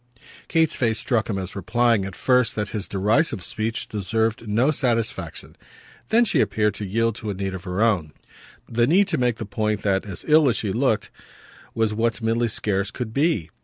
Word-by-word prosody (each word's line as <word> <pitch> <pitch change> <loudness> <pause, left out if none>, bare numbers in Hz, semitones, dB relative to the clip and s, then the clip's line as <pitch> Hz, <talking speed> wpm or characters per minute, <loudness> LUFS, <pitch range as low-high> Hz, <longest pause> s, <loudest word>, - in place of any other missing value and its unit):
Kate's 160 -2 +2
face 115 -3 +1
struck 115 -4 0
him 100 - -1
as 95 -1 -5
replying 115 +2 +1
at 95 -2 -7
first 125 -2 +2
that 105 -2 -2
his 105 -3 -4
derisive 105 - +1
speech 110 +4 -2
deserved 110 +3 -1
no 115 +8 +2
satisfaction; 120 -6 -2 0.5
then 235 +2 +4
she 205 - +1
appeared 105 -1 +1
to 105 - -6
yield 115 +4 0
to 110 -1 -6
a 100 - -3
need 95 0 -3
of 95 0 -7
her 90 +3 0
own 90 -10 +1 0.6
the 120 +1 +1
need 190 +7 +4
to 165 - 0
make 125 -2 +1
the 110 - -6
point 105 +1 -2
that 95 -2 +1
"as 100 -4 -7
ill 155 -2 +5
as 120 - 0
she 100 -4 -2
looked" 120 -3 0 0.6
was 110 -1 +1
what 115 +1 0
Milly 115 +1 +1
scarce 100 -3 -1
could 115 -3 -6
be. 140 - 0
110 Hz, 195 wpm, -23 LUFS, 100-120 Hz, 0.6 s, ill